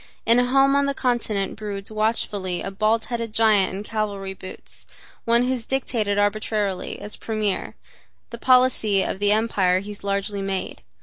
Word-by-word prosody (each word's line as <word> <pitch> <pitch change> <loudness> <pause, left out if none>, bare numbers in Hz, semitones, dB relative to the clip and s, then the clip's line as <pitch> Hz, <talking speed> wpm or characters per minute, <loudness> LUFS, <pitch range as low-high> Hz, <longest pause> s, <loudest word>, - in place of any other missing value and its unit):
In 230 +2 +5
a 245 - +3
home 275 +2 +4
on 280 0 +3
the 280 - -1
continent 225 -6 -1
broods 205 -1 -5
watchfully 210 -4 -1
a 195 - -4
bald 215 +3 +1
headed 230 -2 -4
giant 215 -4 +4
in 195 +2 -5
cavalry 205 -3 -3
boots, 185 0 -10 0.4
one 235 +1 +4
who 250 - 0
has 250 -3 -1
dictated 225 -6 -1
arbitrarily, 205 -1 -1
as 210 - -3
premier, 215 -3 -2 0.6
the 235 - -7
policy 250 -6 +3
of - - -3
the 205 0 +2
empire 200 -4 +2
he 200 +2 -7
has 205 - -10
largely 200 0 -2
made. 195 -1 -4
215 Hz, 170 wpm, -23 LUFS, 200-230 Hz, 0.6 s, In